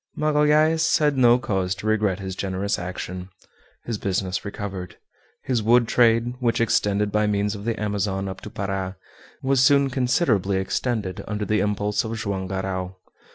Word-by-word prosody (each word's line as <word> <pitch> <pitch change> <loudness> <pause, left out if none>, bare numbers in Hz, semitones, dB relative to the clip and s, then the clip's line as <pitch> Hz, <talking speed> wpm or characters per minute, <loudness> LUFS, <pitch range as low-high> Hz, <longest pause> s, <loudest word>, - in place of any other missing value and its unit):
Magalhaës 155 +2 +3
had 150 -2 +2
no 120 -2 +5
cause 95 -7 -1
to 95 - -9
regret 105 -3 +1
his 95 -1 -5
generous 95 +1 -2
action. 90 +1 -6 0.6
His 115 -4 -3
business 95 -1 -2
recovered. 100 -2 -6 0.5
His 125 -4 0
wood 120 +2 +4
trade, 115 0 +3
which 120 -3 +1
extended 105 -2 +1
by 105 0 +2
means 105 0 0
of 100 0 -8
the 115 -1 -1
Amazon 100 -2 -1
up 95 0 -7
to - - -8
Para, 95 -2 -4 0.5
was 135 -1 +3
soon 140 -1 +4
considerably 125 - +1
extended 95 0 -2
under 105 0 -2
the 105 +2 +1
impulse 105 0 0
of 115 0 -4
Joam 95 -3 -3
Garral. 95 -1 -3
105 Hz, 155 wpm, -23 LUFS, 95-120 Hz, 0.6 s, no